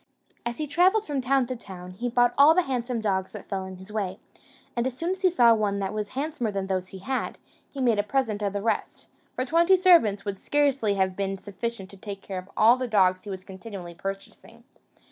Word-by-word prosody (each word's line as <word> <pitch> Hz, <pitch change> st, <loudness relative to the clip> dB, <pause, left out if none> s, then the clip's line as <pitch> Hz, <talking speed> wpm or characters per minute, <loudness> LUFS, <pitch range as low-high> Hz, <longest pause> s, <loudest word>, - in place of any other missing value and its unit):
As 235 Hz, 0 st, -4 dB
he 305 Hz, -, -2 dB
travelled 370 Hz, +8 st, +3 dB
from 285 Hz, -3 st, -2 dB
town 265 Hz, 0 st, +2 dB
to 255 Hz, -, -4 dB
town, 185 Hz, -5 st, -10 dB
he 235 Hz, +7 st, -3 dB
bought 245 Hz, 0 st, +3 dB
all 290 Hz, +3 st, +7 dB
the 365 Hz, -, +4 dB
handsome 245 Hz, -4 st, -2 dB
dogs 190 Hz, -3 st, -1 dB
that -, -, -9 dB
fell 190 Hz, -2 st, -3 dB
in 190 Hz, 0 st, -8 dB
his 190 Hz, +3 st, -12 dB
way; 200 Hz, -3 st, -2 dB, 0.6 s
and 240 Hz, +1 st, 0 dB
as 255 Hz, -1 st, -5 dB
soon 335 Hz, +4 st, -1 dB
as 380 Hz, 0 st, -4 dB
he 375 Hz, -, +5 dB
saw 240 Hz, -9 st, +5 dB
one 210 Hz, -2 st, 0 dB
that 195 Hz, 0 st, -2 dB
was 210 Hz, -1 st, -3 dB
handsomer 280 Hz, -3 st, -2 dB
than 195 Hz, -2 st, -2 dB
those 185 Hz, -1 st, -2 dB
he 190 Hz, -, -10 dB
had, 255 Hz, +8 st, -3 dB, 0.3 s
he 280 Hz, -, -9 dB
made 235 Hz, -5 st, +3 dB
a -, -, +3 dB
present 215 Hz, -2 st, -1 dB
of 200 Hz, -1 st, -1 dB
the 200 Hz, 0 st, -3 dB
rest; 230 Hz, -, -2 dB, 0.3 s
for 255 Hz, -, -1 dB
twenty 340 Hz, +6 st, +4 dB
servants 325 Hz, -, +4 dB
would 200 Hz, -2 st, -4 dB
scarcely 275 Hz, -8 st, +1 dB
have 190 Hz, -1 st, +1 dB
been 195 Hz, 0 st, -2 dB
sufficient 205 Hz, +1 st, -5 dB
to 200 Hz, -, -13 dB
take 195 Hz, 0 st, -8 dB
care 190 Hz, -2 st, -5 dB
of 185 Hz, +2 st, -12 dB
all 230 Hz, +3 st, +6 dB
the 255 Hz, -1 st, -2 dB
dogs 185 Hz, -4 st, +3 dB
he -, -, -7 dB
was 190 Hz, -1 st, -6 dB
continually 190 Hz, -2 st, -9 dB
purchasing. 195 Hz, +3 st, -8 dB
215 Hz, 230 wpm, -26 LUFS, 195-260 Hz, 0.6 s, all